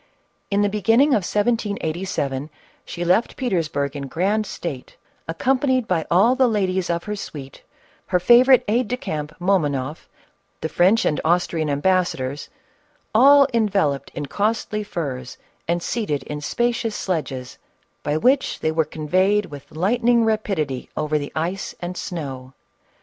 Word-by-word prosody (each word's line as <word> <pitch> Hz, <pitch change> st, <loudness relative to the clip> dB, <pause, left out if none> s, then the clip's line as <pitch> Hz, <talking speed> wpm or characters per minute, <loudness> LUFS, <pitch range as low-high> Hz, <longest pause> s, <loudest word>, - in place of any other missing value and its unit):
In 200 Hz, 0 st, +2 dB
the -, -, +3 dB
beginning 225 Hz, +7 st, +3 dB
of 240 Hz, -8 st, +3 dB
1787, 190 Hz, -, -1 dB, 0.4 s
she 175 Hz, 0 st, -5 dB
left 185 Hz, +7 st, +2 dB
Petersburg 160 Hz, -, -1 dB
in 140 Hz, -1 st, -5 dB
grand 200 Hz, +9 st, 0 dB
state, 140 Hz, -7 st, -6 dB, 0.3 s
accompanied 255 Hz, -, +1 dB
by 165 Hz, -4 st, 0 dB
all 200 Hz, +8 st, +5 dB
the 260 Hz, -1 st, +3 dB
ladies 190 Hz, -5 st, 0 dB
of 170 Hz, 0 st, -1 dB
her 210 Hz, -, -4 dB
suite, 140 Hz, -9 st, -9 dB, 0.5 s
her 180 Hz, -, +2 dB
favorite 245 Hz, +7 st, +6 dB
aid 235 Hz, +3 st, +1 dB
de 250 Hz, -, -2 dB
camp, 150 Hz, -9 st, -4 dB
MomonofF, 150 Hz, -6 st, 0 dB, 0.5 s
the 160 Hz, -, -2 dB
French 190 Hz, +8 st, +3 dB
and 150 Hz, -, +1 dB
Austrian 165 Hz, -2 st, +1 dB
ambassadors, 145 Hz, -3 st, 0 dB, 0.6 s
all 275 Hz, +4 st, +7 dB
enveloped 195 Hz, -11 st, +1 dB
in 145 Hz, -, -3 dB
costly 210 Hz, +4 st, -1 dB
furs, 135 Hz, -10 st, -5 dB, 0.3 s
and 170 Hz, 0 st, 0 dB
seated 205 Hz, -12 st, -2 dB
in 150 Hz, 0 st, -6 dB
spacious 235 Hz, +5 st, -1 dB
sledges, 135 Hz, -8 st, -4 dB, 0.4 s
by 145 Hz, +1 st, -1 dB
which 260 Hz, -, +2 dB
they 155 Hz, -, +1 dB
were 160 Hz, 0 st, +1 dB
conveyed 185 Hz, +7 st, +1 dB
with 145 Hz, -5 st, -11 dB
lightning 230 Hz, +7 st, +2 dB
rapidity 195 Hz, -, -1 dB
over 150 Hz, 0 st, 0 dB
the 145 Hz, -, -6 dB
ice 175 Hz, +5 st, -3 dB
and 175 Hz, +1 st, -5 dB
snow. 135 Hz, -8 st, -6 dB
180 Hz, 140 wpm, -22 LUFS, 150-215 Hz, 0.6 s, all